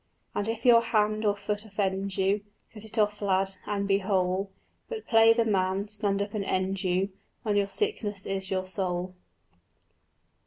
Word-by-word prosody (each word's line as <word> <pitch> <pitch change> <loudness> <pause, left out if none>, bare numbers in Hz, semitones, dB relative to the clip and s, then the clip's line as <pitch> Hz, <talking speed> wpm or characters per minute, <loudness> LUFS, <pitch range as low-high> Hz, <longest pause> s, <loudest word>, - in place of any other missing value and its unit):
And 205 - -2
if 230 +1 -3
your 235 -2 +8
hand 215 -1 +1
or 205 -1 +3
foot 205 +1 -3
offend 195 -2 -2
you, 195 +2 +2 0.3
Cut 215 -1 -10
it 220 +1 -9
off, 210 -1 +1
lad, 195 -1 +1
and 200 -1 -1
be 195 0 +3
whole; 190 0 0 0.4
But 455 -2 -5
play 225 0 +6
the 230 0 +3
man, 195 -1 0
stand 205 -1 0
up 200 - -8
and 210 -2 -1
end 190 0 -1
you, 185 +2 +1 0.3
When 210 -2 0
your 200 -1 +2
sickness 210 - -1
is 190 -1 -3
your 185 -1 -1
soul. 185 -1 -3
200 Hz, 170 wpm, -28 LUFS, 190-215 Hz, 0.4 s, your